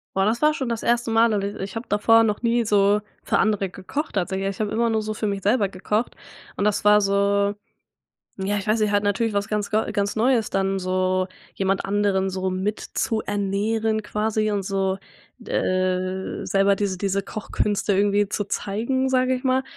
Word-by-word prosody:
Boah, 195 0 +2
das 225 +3 0
war 305 0 +4
schon 265 -4 -3
das 230 -2 -3
1. 240 0 +1
Mal. 225 0 +4
Und 200 -1 0
i 200 +1 -3
ich 195 0 -7
habe 230 - -6
davor 225 +2 +4
noch 210 -2 0
nie 235 0 +1
so 205 -1 +3 0.2
für - - +1
andere 200 -2 +1
gekocht 210 - -5
tatsächlich, 195 +1 -1
ich 195 - -7
habe 210 -1 -1
immer 230 +2 +1
nur 220 -1 +1
so 215 0 -3
für 215 0 -2
mich 200 -1 -2
selber 205 0 +2
gekocht 210 +5 -2 0.4
und 200 - 0
das 210 -1 +1
war 210 0 +6
so, 200 0 +1 0.8
ja, 195 +2 -1
ich 200 - -5
weiß 215 +1 +2
nicht, 210 - +2
halt 205 0 +2
natürlich 210 +2 0
was 200 0 0
ganz 210 -1 -2
ga 215 +1 +1
ganz 200 0 -1
Neues 230 0 +2
dann 195 0 0
so 185 0 0 0.3
jemand 195 0 0
anderen 195 -1 +1
so 190 0 -2
mit 190 +3 -2
zu 220 -1 -2
ernähren 210 +2 -1
quasi 215 0 -1
und 200 -1 -1
so, 195 0 -1 0.4
d - - -10
äh, 185 0 -1
selber 195 0 +3
diese 195 -2 -2
diese 195 0 0
Kochkünste 210 0 -1
irgendwie 205 +1 +2
zu 205 - -1
zeigen, 235 +7 -1
sage 255 0 +2
ich 255 - -3
mal 260 0 +2
205 Hz, 200 wpm, -23 LUFS, 195-220 Hz, 0.8 s, war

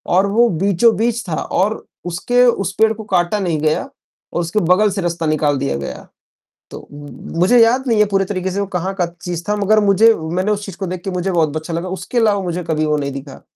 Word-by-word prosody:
और 190 +2 +4
वो 235 +3 +4
बीचों-बीच 225 +5 +2
था 155 - -1
और 205 +4 -1 0.2
उसके 245 +9 +1
उस 195 -6 +1
पेड़ 220 0 +5
को 220 0 -9
काटा 185 0 0
नहीं 170 -5 -1
गया 155 0 0 0.4
और - - -1
उसके 175 +5 -1
बगल 210 +3 +4
से 195 0 -3
रास्ता 170 -1 -2
निकाल 150 -2 +1
दिया 140 - -2
गया, 70 - -7 0.6
तो - - -10 0.5
मुझे 235 +8 +5
याद 245 +3 +2
नहीं 225 -3 +2
है 210 - +5
पूरे 195 0 +2
तरीके 190 -1 -3
से 200 - -3
वो 200 - 0
कहाँ 185 +3 -3
का 180 -2 0 0.2
चीज़ 175 -1 -4
था 210 - +2
मगर 210 +1 +3
मुझे 215 +4 +5
मैंने 180 +6 -2
उस 205 0 -2
चीज 195 - -8
को 195 0 -5
देख 180 0 -6
के 195 - -3
मुझे 180 +1 -2
बहुत 160 -4 +1
अच्छा 160 +2 -6
लगा, 170 +2 -3
उसके 190 +6 -5
अलावा 210 -3 +3
मुझे 180 0 -3
कभी 155 -1 -1
वो 150 0 +1
नहीं 140 -1 -3
दिखा। 135 0 -9
185 Hz, 230 wpm, -18 LUFS, 170-210 Hz, 0.6 s, पेड़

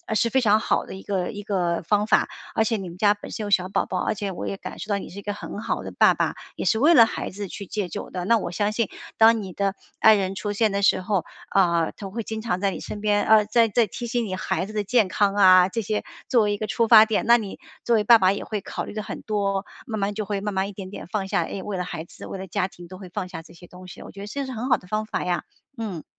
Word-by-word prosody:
是 230 - +2
非 265 +2 +2
常 215 -2 +4
好 - - 0
的 - - -9
一 190 - -10
个 190 -3 -2
一 205 -2 -7
个 180 -4 -1
方 210 +3 +2
法， - - +3 0.3
而 220 - +3
且 225 - 0
你 190 -3 -6
们 170 - -11
家 205 +1 +4
本 205 - -11
身 220 - -4
有 - - -4
小 185 -2 +2
宝 - - 0
宝， - - -3
而 - - 0
且 200 -1 -3
我 180 - -6
也 195 - -3
感 - - -8
受 - - -7
到 200 - +1
你 - - -7
是 195 - -9
一 - - -8
个 205 - -3
很 205 0 -7
好 - - -2
的 - - -7
爸 - - +6
爸， - - 0 0.2
也 - - -4
是 220 - +2
为 305 +7 +6
了 230 - +9
孩 - - -4
子 200 +1 -6
去 200 - -8
戒 200 0 -3
酒 - - -6
的， 180 -1 -4
那 230 +4 +4
我 180 - -4
相 205 +4 0
信， 230 -3 0 0.3
当 225 0 +6
你 190 -3 -7
的 195 0 0 0.3
爱 220 0 +7
人 195 -1 -1
出 205 +1 -3
现 215 +2 +2
的 200 - 0
时 - - +4
候， 185 -1 -1 0.3
啊， 170 -4 +2
她 195 -2 -8
会 230 +4 -4
经 220 0 -5
常 215 -5 -1
在 200 - +1
你 - - -6
身 210 - -6
边， 205 -1 +2
啊， 215 -1 +5
在 230 +1 +3
在 225 +1 +2
提 240 - -6
醒 240 0 -1
你 185 -3 -3
孩 185 - -2
子 215 - -10
的 210 -1 -1
健 220 0 +3
康 200 +1 +1
啊， 185 -2 +7
这 230 - -2
些 210 0 -2 0.2
作 235 -3 +4
为 210 - +1
一 - - -2
个 215 - -4
出 230 +1 0
发 220 -2 +9
点， 220 -1 0
那 235 0 +7
你 205 -4 -6 0.3
作 235 - +3
为 215 - +2
爸 230 +2 +8
爸 190 -2 +3
也 - - -5
会 210 -2 -3
考 - - -5
虑 - - -8
得 215 - -3
很 - - -7
多， 200 -2 -1 0.2
慢 220 -2 -3
慢 200 +1 -1
就 215 0 -3
会 200 -1 -2
慢 210 0 -3
慢 190 0 0
一 200 - -8
点 190 -1 -8
点 195 - -9
放 195 +2 -2
下， 195 -4 +1
哎， 190 +3 -5
为 200 -1 -4
了 180 - -2
孩 160 -2 -5
子， 170 - -12
为 - - -6
了 190 0 -7
家 185 +1 -1
庭 175 -2 -14
都 185 - -9
会 190 - -10
放 185 +1 -5
下 175 - -7
这 165 - -17
些 175 +1 -14
东 180 +1 -13
西， - - -11
我 - - -10
觉 195 - -12
得 200 - -7
这 275 +6 -4
是 260 - -6
很 245 +1 -4
好 - - +5
的 180 - -17
方 215 +2 -1
法 215 - -3
呀， 175 -1 -1 0.3
嗯。 205 -8 -5
205 Hz, 330 characters per minute, -24 LUFS, 190-220 Hz, 0.3 s, 了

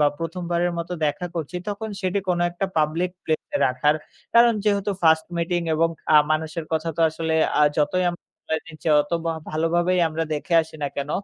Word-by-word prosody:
বা 150 - +5
১ম 165 +2 -4
বারের 175 +1 +1
মতো 170 +1 -4
দেখা 180 +5 -2
করছি 165 +2 -4
তখন 205 +2 -4
সেটি 185 +1 0
কোন 175 - +2
একটা 175 +3 -2
পাবলিক 160 +4 +1
প্লেসে 160 - -2
রাখার। 130 +4 +2 0.4
কারণ 235 0 +7
যেহেতু 205 -1 +1
1st 160 -1 +4
মিটিং 175 +1 0
এবং 165 +1 +3 0.3
আ - - +10
মানুষের 160 +1 -1
কথা 160 +1 0
তো - - -2
আসলে 160 0 -2 0.3
আ - - +6 0.2
যতই 150 +5 +2
আমরা 175 - -9 0.3
জানি 160 0 -3
যে - - +1
অত 145 - -5
ভ - - -3 0.2
ভালোভাবেই 170 +3 +1
আমরা 160 +1 -2
দেখে 170 +4 -2
আসি 160 - -12
না 145 - 0
কেন 140 +1 -3
165 Hz, 190 wpm, -23 LUFS, 155-180 Hz, 0.4 s, আ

